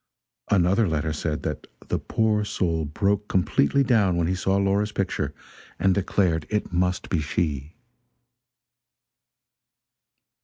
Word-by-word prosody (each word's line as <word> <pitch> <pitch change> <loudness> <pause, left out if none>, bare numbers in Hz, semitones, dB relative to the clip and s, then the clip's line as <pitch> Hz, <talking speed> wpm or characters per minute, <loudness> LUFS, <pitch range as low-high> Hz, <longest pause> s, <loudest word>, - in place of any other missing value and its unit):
Another 95 +3 +3
letter 80 -1 -1
said 75 0 -3
that 75 - -4 0.2
"the - - 0
poor 110 -2 +1
soul 85 -6 -1
broke 100 +7 0
completely 95 - +2
down 105 -8 +3
when 85 - +1
he 90 - 0
saw 95 +1 0
Laura's 100 +2 +1
picture, 95 -8 -2 0.5
and 95 -1 +3
declared 90 -4 0
it 105 -4 -2
must 90 +1 0
be 85 - 0
she." 75 0 -2
90 Hz, 120 wpm, -25 LUFS, 80-100 Hz, 0.5 s, Another